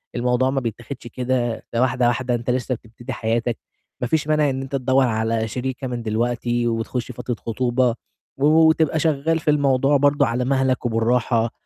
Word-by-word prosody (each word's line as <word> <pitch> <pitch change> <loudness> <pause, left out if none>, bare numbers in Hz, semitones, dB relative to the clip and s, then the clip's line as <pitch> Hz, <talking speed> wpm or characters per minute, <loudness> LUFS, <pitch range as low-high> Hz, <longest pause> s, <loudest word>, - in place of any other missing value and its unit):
الموضوع 125 +2 +1
ما 135 0 0
بيتاخدش 120 +2 -6
كده، 125 -1 -2
ده 115 - +1
واحدة، 125 -1 +2
واحدة 120 0 0
أنت 120 +1 -4
لسّه 125 0 0
بتبتدي 115 +1 -9
حياتك، 115 +1 -1 0.4
ما 125 - 0
فيش 155 +2 0
مانع 150 -2 +3
إن 135 0 -2
أنت 135 +1 -5
تدوّر 130 0 +2
على 110 0 0
شريكة 130 +3 -4
من 120 -2 -4
دلوقتي 120 +2 -1
وتخُش 115 +2 -2
فترة 120 0 -4
خطوبة 120 +1 0 0.4
و 140 - +1
وتبقى 160 0 +4
شغّال 160 +1 +1
في 155 -1 +1
الموضوع 140 -1 +3
برضه 145 +1 +3
على 125 +2 -1
مهلك 130 -1 +1
وبالراحة 115 0 +1
125 Hz, 170 wpm, -22 LUFS, 120-135 Hz, 0.4 s, وتبقى